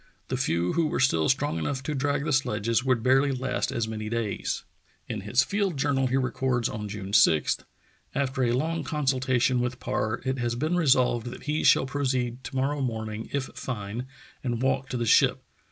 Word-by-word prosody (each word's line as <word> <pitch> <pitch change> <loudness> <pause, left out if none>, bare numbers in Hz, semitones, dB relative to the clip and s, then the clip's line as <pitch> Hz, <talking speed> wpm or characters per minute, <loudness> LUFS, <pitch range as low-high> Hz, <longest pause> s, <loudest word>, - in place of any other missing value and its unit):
'' - - -40
The - - 0
few 85 +2 0
who 165 -1 +2
were - - -2
still 80 -12 +3
strong 135 - +1
enough 130 - -2
to 150 - -2
drag 145 +1 0
the 150 - 0
sledges 115 -2 +1
would 130 -4 +1
barely 135 +3 +4
last 130 -1 -1
as 115 -1 -1
many 110 -1 -4
days!" 115 -3 -2 0.4
In 110 - -4
his 110 +6 +2
field 200 -5 -1
journal 135 -1 +1
he 130 +1 +1
records 130 -2 0
on 105 -1 -5
June 100 -1 -6
6: 80 -6 +4 0.6
"After 135 -1 0
a 120 - +3
lonjr 160 +7 0
consultation 130 -4 +1
with 125 +1 -2
Parr 110 +2 -1
it 130 0 -1
has 120 -1 -1
been 155 +7 0
resolved 130 -7 +3
that 120 - -8
he 150 +1 -1
shall - - +5
proceed 130 -3 -1
to - - -7
morrow 140 +2 0
morning, 110 -3 -3
if 140 -1 0
fine, 115 0 -5 0.4
and 120 -3 -1
walk 130 0 0
to 125 - -2
the 120 - -1
ship. - - +4
130 Hz, 195 wpm, -27 LUFS, 115-135 Hz, 0.6 s, shall